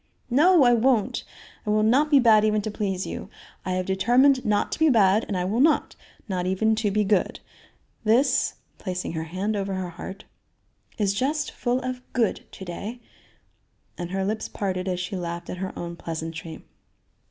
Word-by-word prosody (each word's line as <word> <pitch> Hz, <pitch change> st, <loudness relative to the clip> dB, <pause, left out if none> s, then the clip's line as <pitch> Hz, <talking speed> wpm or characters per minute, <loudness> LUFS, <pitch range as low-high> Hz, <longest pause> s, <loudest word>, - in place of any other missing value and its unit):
"No, 320 Hz, +5 st, +6 dB
I 245 Hz, -1 st, +6 dB
won't! 235 Hz, -2 st, +2 dB, 0.4 s
I 210 Hz, -, -4 dB
will 215 Hz, 0 st, +3 dB
not 265 Hz, +8 st, +3 dB
be 290 Hz, -, +6 dB
bad 220 Hz, -4 st, +5 dB
even 215 Hz, 0 st, +2 dB
to 215 Hz, -, -3 dB
please 195 Hz, -3 st, -2 dB
you; -, -, -6 dB, 0.3 s
I 185 Hz, -, -2 dB
have 185 Hz, 0 st, -1 dB
determined 245 Hz, +8 st, +3 dB
not 210 Hz, -1 st, +1 dB
to -, -, -4 dB
be 320 Hz, -1 st, +5 dB
bad 215 Hz, -3 st, +4 dB
and 195 Hz, -, -2 dB
I 180 Hz, -, -1 dB
will 210 Hz, +6 st, -1 dB
not 305 Hz, +3 st, +3 dB, 0.3 s
not 180 Hz, -3 st, -2 dB
even 220 Hz, +4 st, +2 dB
to 215 Hz, -1 st, +1 dB
be 210 Hz, +1 st, +1 dB
good. 200 Hz, -2 st, +1 dB, 0.6 s
This," 230 Hz, +6 st, +3 dB, 0.2 s
placing 180 Hz, -2 st, -4 dB
her 160 Hz, -1 st, -3 dB
hand 190 Hz, +6 st, -2 dB
over 195 Hz, -1 st, -2 dB
her 185 Hz, -1 st, -3 dB
heart, 190 Hz, +3 st, -9 dB, 0.7 s
"is 200 Hz, -3 st, +1 dB
just 285 Hz, +7 st, -1 dB
full 245 Hz, +1 st, -1 dB
of 255 Hz, -1 st, -4 dB
'good' 230 Hz, -4 st, 0 dB
to 190 Hz, -, -9 dB
day," 205 Hz, +7 st, -6 dB, 1.0 s
and 175 Hz, -1 st, -5 dB
her 190 Hz, +1 st, -1 dB
lips 215 Hz, +2 st, -2 dB
parted 185 Hz, -2 st, -3 dB
as 180 Hz, -1 st, -1 dB
she 180 Hz, +3 st, -4 dB
laughed 170 Hz, -1 st, -5 dB
at -, -, -5 dB
her 190 Hz, -, -3 dB
own 170 Hz, 0 st, -5 dB
pleasantry. 165 Hz, -1 st, -6 dB
205 Hz, 185 wpm, -25 LUFS, 185-240 Hz, 1.0 s, No